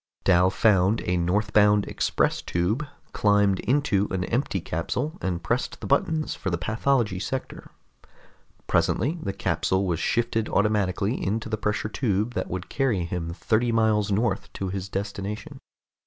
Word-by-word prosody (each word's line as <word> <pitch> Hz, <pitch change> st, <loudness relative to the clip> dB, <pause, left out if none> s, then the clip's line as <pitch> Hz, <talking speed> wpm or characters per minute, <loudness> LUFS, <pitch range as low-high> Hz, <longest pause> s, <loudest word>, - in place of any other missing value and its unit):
Dal 90 Hz, -1 st, +5 dB
found 100 Hz, 0 st, +3 dB
a 90 Hz, -, +1 dB
northbound 105 Hz, +3 st, +3 dB
express -, -, 0 dB
tube, 105 Hz, +12 st, -1 dB, 0.3 s
climbed 100 Hz, -2 st, +3 dB
into 120 Hz, -7 st, +1 dB
an 95 Hz, -1 st, -1 dB
empty 115 Hz, -2 st, -1 dB
capsule, 85 Hz, -, -3 dB
and 90 Hz, -2 st, -2 dB
pressed 120 Hz, +7 st, -1 dB
the -, -, -7 dB
buttons 155 Hz, +2 st, +1 dB
for 100 Hz, -, -4 dB
the 85 Hz, -, 0 dB
pathology 110 Hz, +1 st, 0 dB
sector. 130 Hz, +6 st, -5 dB, 1.0 s
Presently 155 Hz, +8 st, +1 dB
the 100 Hz, -, -2 dB
capsule 95 Hz, 0 st, 0 dB
was 85 Hz, -3 st, -1 dB
shifted 115 Hz, -1 st, 0 dB
automatically 105 Hz, +1 st, +1 dB
into 110 Hz, +3 st, -2 dB
the 110 Hz, -, 0 dB
pressure 105 Hz, +1 st, -1 dB
tube 110 Hz, -1 st, -1 dB
that -, -, -3 dB
would 90 Hz, +1 st, -4 dB
carry 120 Hz, -10 st, 0 dB
him 85 Hz, -1 st, -4 dB
thirty 115 Hz, +7 st, 0 dB
miles 110 Hz, -2 st, +2 dB
north 110 Hz, +4 st, 0 dB
to 95 Hz, -, -4 dB
his 95 Hz, 0 st, -4 dB
destination. 100 Hz, +2 st, -5 dB
105 Hz, 145 wpm, -25 LUFS, 95-115 Hz, 1.0 s, Dal